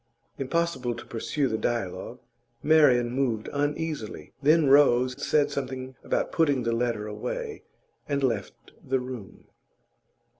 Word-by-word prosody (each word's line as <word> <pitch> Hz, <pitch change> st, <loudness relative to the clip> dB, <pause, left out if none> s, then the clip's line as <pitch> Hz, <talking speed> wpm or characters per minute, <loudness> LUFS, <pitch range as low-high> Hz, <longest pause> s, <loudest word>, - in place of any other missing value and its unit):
Impossible 135 Hz, -4 st, -1 dB
to 120 Hz, -, -9 dB
pursue 135 Hz, +5 st, -1 dB
the 110 Hz, -2 st, -2 dB
dialogue; 115 Hz, -7 st, -3 dB, 0.5 s
Marian 140 Hz, -6 st, +5 dB
moved 120 Hz, -4 st, -1 dB
uneasily, 145 Hz, -4 st, -3 dB
then 155 Hz, +1 st, +4 dB
rose, 130 Hz, -3 st, +5 dB
said 150 Hz, -2 st, +2 dB
something 130 Hz, -1 st, -4 dB
about -, -, -1 dB
putting 145 Hz, -6 st, +2 dB
the 115 Hz, -, 0 dB
letter 115 Hz, -2 st, -1 dB
away, 455 Hz, -, -5 dB, 0.5 s
and 140 Hz, -1 st, 0 dB
left 115 Hz, -7 st, -2 dB
the 130 Hz, 0 st, 0 dB
room. 125 Hz, -6 st, -8 dB
130 Hz, 120 wpm, -27 LUFS, 120-145 Hz, 0.5 s, Marian